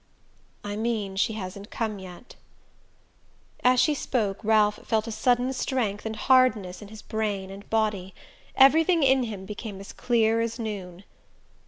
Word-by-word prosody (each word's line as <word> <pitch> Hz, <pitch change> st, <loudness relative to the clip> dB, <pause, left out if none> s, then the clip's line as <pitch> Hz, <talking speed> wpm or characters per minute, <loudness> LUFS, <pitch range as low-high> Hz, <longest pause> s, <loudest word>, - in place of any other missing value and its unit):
"I 205 Hz, 0 st, -4 dB
mean 215 Hz, -4 st, -2 dB
she 210 Hz, +3 st, +1 dB
hasn't 200 Hz, 0 st, -7 dB
come 215 Hz, -3 st, -3 dB
yet." 185 Hz, +6 st, -12 dB, 1.3 s
As 250 Hz, 0 st, +4 dB
she 305 Hz, -, +4 dB
spoke 220 Hz, -7 st, -2 dB
Ralph 210 Hz, -1 st, +3 dB
felt 220 Hz, -1 st, 0 dB
a 230 Hz, -, -5 dB
sudden 245 Hz, +3 st, +1 dB
strength 225 Hz, -5 st, -2 dB
and 220 Hz, -, -4 dB
hardness 220 Hz, -7 st, +2 dB
in 210 Hz, -, -10 dB
his 215 Hz, +1 st, -12 dB
brain 205 Hz, -3 st, -3 dB
and 195 Hz, +1 st, -11 dB
body. 210 Hz, -4 st, -1 dB, 0.4 s
Everything 320 Hz, +5 st, +5 dB
in 265 Hz, -1 st, +4 dB
him 205 Hz, -4 st, -7 dB
became 205 Hz, 0 st, -7 dB
as 195 Hz, -, -10 dB
clear 230 Hz, -2 st, +1 dB
as 230 Hz, 0 st, -2 dB
noon. 195 Hz, -5 st, -6 dB
220 Hz, 150 wpm, -26 LUFS, 200-245 Hz, 1.3 s, Everything